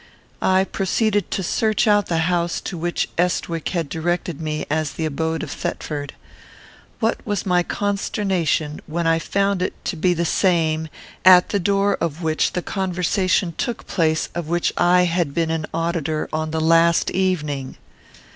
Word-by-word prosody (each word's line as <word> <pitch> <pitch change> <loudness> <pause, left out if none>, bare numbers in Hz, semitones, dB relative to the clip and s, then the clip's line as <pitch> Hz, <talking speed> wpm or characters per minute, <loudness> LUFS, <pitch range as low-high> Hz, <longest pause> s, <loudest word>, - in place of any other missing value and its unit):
I 190 0 +3
proceeded 205 +1 0
to 190 - -2
search 215 +5 +1
out 205 -2 +3
the 170 - 0
house 175 -1 0
to - - -5
which 175 +1 -1
Estwick 170 -2 0
had 170 -4 -2
directed 170 0 -2
me 155 -1 -3
as 155 0 -1
the 160 - -3
abode 160 +2 -2
of - - -6
Thetford. 145 -2 -4 0.9
What 225 -1 0
was 205 -2 -2
my 180 -2 +3
consternation 190 -6 -1
when 170 +2 -2
I 165 0 +3
found 200 +2 0
it - - -1
to - - -2
be 175 +2 +1
the 170 +1 0
same 160 -3 +1 0.3
at 180 -1 +7
the 200 - 0
door 200 +1 +2
of 165 +1 -2
which 155 -1 +1
the 180 - -2
conversation 185 -1 0
took 240 - -3
place 160 -4 0
of 170 -2 -4
which 175 +1 0
I 180 +1 +4
had 170 -4 0
been 165 -1 +1
an 160 -1 -2
auditor 165 -2 -1
on 155 0 -1
the 160 0 -2
last 165 +1 +4
evening! 150 -8 -1
170 Hz, 165 wpm, -21 LUFS, 160-190 Hz, 0.9 s, at